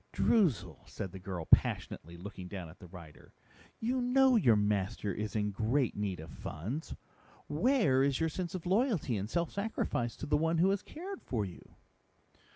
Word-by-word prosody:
"Droozle," 185 - +2
said 95 -3 -5
the 95 - -8
girl 90 -3 -5
passionately, 85 +2 +2
looking 95 0 -8
down 90 -3 -6
at 85 - -15
the 90 - -11
writer, 85 -4 -13 0.5
"you 250 +3 0
know 260 +1 +5
your 125 - +5
master 105 -1 0
is 105 +3 -4
in 105 -1 +1
great 115 +6 +1
need 100 -3 -2
of 80 - -9
funds. 110 - -5 0.5
Where 155 - +3
is 135 -1 +2
your 160 0 +1
sense 175 +2 -4
of 180 - -5
loyalty 190 - +1
and 100 +1 -3
self 170 +3 0
sacrifice 200 - -2
for - - -6
the 150 0 +2
one 165 +2 +1
who 185 +4 +4
has 200 0 0
cared 375 +5 -8
for 110 -5 -2
you?" 90 - -12
125 Hz, 175 wpm, -32 LUFS, -, 0.5 s, know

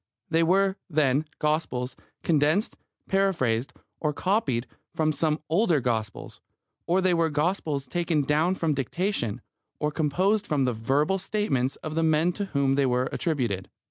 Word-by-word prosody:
They 165 0 +3
were, 190 +3 +3
then, 150 -2 +2
Gospels 135 -5 -1 0.3
condensed, 155 +6 +2 0.3
paraphrased, 140 -12 +1 0.3
or 150 -2 0
copied 145 - 0 0.3
from 155 -1 +1
some 155 0 0
older 170 -1 +3
Gospels, 110 -4 -3 0.5
or 180 +3 +3
they 185 -1 +3
were 165 -1 +2
Gospels 150 -2 -1
taken 165 +1 0
down 155 +6 +2
from 165 -4 0
dictation, 140 - -2 0.4
or 150 0 -1
composed 185 +8 +1
from 140 -3 +1
the 125 - +1
verbal 140 - +1
statements 180 -10 -1
of 155 - -4
the 165 - 0
men 160 +2 +3
to 200 - -3
whom 140 -7 +1
they 140 0 +2
were 125 +1 +1
attributed. 120 - -2
155 Hz, 145 wpm, -26 LUFS, 135-180 Hz, 0.5 s, They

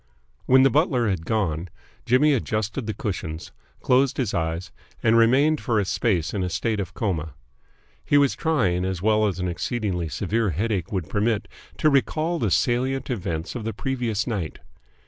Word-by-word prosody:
When 130 +1 +6
the 135 - +5
butler 140 -5 +2
had 90 -5 -2
gone, 90 -6 -1 0.4
Jimmy 145 +5 +4
adjusted 110 -1 -2
the 110 - -1
cushions, 90 -9 -5 0.3
closed 130 +1 +2
his 125 -7 -1
eyes, 85 +2 -2 0.3
and 110 - +4
remained 135 +7 +4
for 115 -4 +1
a 100 - 0
space 90 -4 0
in 100 - -1
a 90 - -1
state 105 +5 -1
of 95 - -5
coma. 80 -8 -2 0.7
He 145 - +3
was 140 -2 +4
trying, 105 - +1
as 95 -1 -3
well 110 0 +3
as 95 -4 -2
an 90 0 -2
exceedingly 90 -2 -2
severe 110 - 0
headache 95 +1 -2
would 95 -6 -2
permit, 105 +1 0 0.3
to 155 - +3
recall 155 +5 +1
the 110 - +1
salient 130 +7 0
events 85 -7 -3
of 120 - -5
the 115 +1 -3
previous 120 -3 -2
night. 100 -10 -3
110 Hz, 170 wpm, -24 LUFS, 90-125 Hz, 0.7 s, When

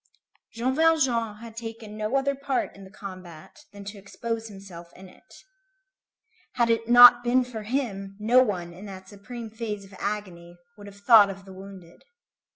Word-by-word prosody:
Jean 245 +3 -1
Valjean 265 -8 +2
had 230 -1 -11
taken 225 -2 -8
no 215 +4 -2
other 275 +1 +1
part 275 -1 -3
in 195 0 -13
the - - -13
combat 185 - -11
than 200 0 -11
to 205 0 -8
expose 225 +3 -5
himself 190 -4 -12
in 190 +1 -13
it. 180 - -19 1.1
Had 235 -2 +2
it 230 0 -1
not 245 0 +9
been 250 +1 +2
for 240 -3 -7
him, 210 -5 -3
no 235 +4 +5
one, 180 -8 -2
in 190 +4 -11
that 190 -1 -10
supreme 220 +3 -9
phase 215 -3 -5
of 195 - -17
agony, 180 -4 -5 0.2
would 205 -1 -13
have 200 0 -14
thought 210 -2 +7
of 195 0 -9
the 190 - -12
wounded. 190 -3 -13
210 Hz, 170 wpm, -25 LUFS, 195-235 Hz, 1.1 s, not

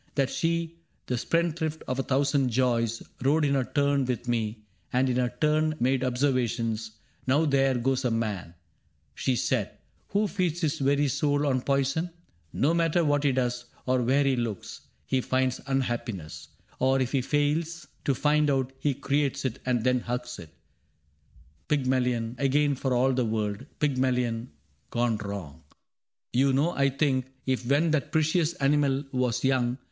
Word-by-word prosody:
That 135 -2 +1
she, 165 0 -1 0.3
the 125 - -1
spendthrift 160 +3 -1
of 130 +1 -2
a - - +3
thousand 135 0 +1
joys. 115 -2 +1 0.2
Rode 150 +3 +3
in 140 - +2
her 135 -2 +2
turn 140 +3 +1
with 125 -1 -3
me, 110 -2 -1 0.3
and 130 +1 +2
in 125 -1 0
her 125 -1 +1
turn 155 0 +2
Made 130 +1 +2
observations: 120 -4 0 0.2
' - - -35
Now 145 +5 +3
there 135 -2 +3
goes 130 +2 0
a 125 - +2
man,* 105 -7 -2 0.6
She 130 - 0
said, - - -1 0.2
' - - -39
who 205 +2 +1
feeds 180 -4 -1
his 155 -1 0
very 140 +1 +2
soul 145 +2 +1
on 130 -3 +1
poison: 140 +5 0 0.4
No 150 +4 +2
matter 170 0 +2
what 145 -1 +2
he 140 - +3
does, 125 -1 -1 0.2
or 130 0 +2
where 135 +4 +3
he 135 -1 +2
looks, 115 -5 -4 0.2
He 130 -1 +1
finds 130 0 0
unhappiness; 120 - -3 0.3
or, 130 +1 +3
if 130 -1 0
he 135 - +2
fails 155 +4 0
^ - - -28 0.2
To 140 - +2
find 150 +2 +2
it, 135 -1 0
he 140 -1 0
creates 140 0 0
it, 125 - -2
and 120 -3 +1
then 125 0 +3
hugs 125 0 -4
it: 85 -2 -10 1.2
Pygmalion 125 -4 0
again 145 +1 +2
for 135 0 -2
all 130 +2 +3
the 125 0 +1
world 110 +3 -2
— - - -39
Pygmalion 125 -4 0 0.4
gone 120 -2 +1
wrong. 100 -9 -6 0.7
You 135 +2 +3
know 145 +6 +2
I 140 -4 +2
think 130 -2 0 0.2
If 130 -2 -1
when 150 +5 +3
that 150 0 0
precious 160 +1 +2
animal 140 -1 +2
was 125 -3 0
young. 130 -2 +1
130 Hz, 170 wpm, -27 LUFS, 125-145 Hz, 1.2 s, a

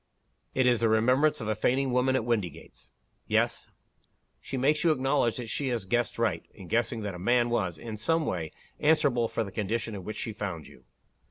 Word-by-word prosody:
It 130 - +3
is 120 -2 +4
the 115 - +2
remembrance 125 +7 +3
of 110 - -4
a 110 - +2
fainting 130 +5 +1
woman 125 +1 +2
at 115 - 0
Windygates." 105 -9 -3 0.4
"Yes." - - 0 0.7
"She 135 - -5
makes 150 +5 +2
you 170 - +4
acknowledge 135 -5 +1
that 125 - -4
she 135 +5 -2
has 120 -6 -2
guessed 120 +4 0
right, 115 -3 0
in 95 -4 -11
guessing 115 0 0
that 100 -2 -3
a 90 - -8
man 120 +4 +2
was, 95 -8 0
in 110 +7 -7
some 165 +8 +1
way, 80 - -3 0.3
answerable 140 -6 +3
for 115 - -2
the 100 - -8
condition 110 +2 -2
in 100 -2 -6
which 110 - -6
she 110 - -4
found 95 -7 -5
you. - - -17
115 Hz, 200 wpm, -28 LUFS, 105-130 Hz, 0.7 s, is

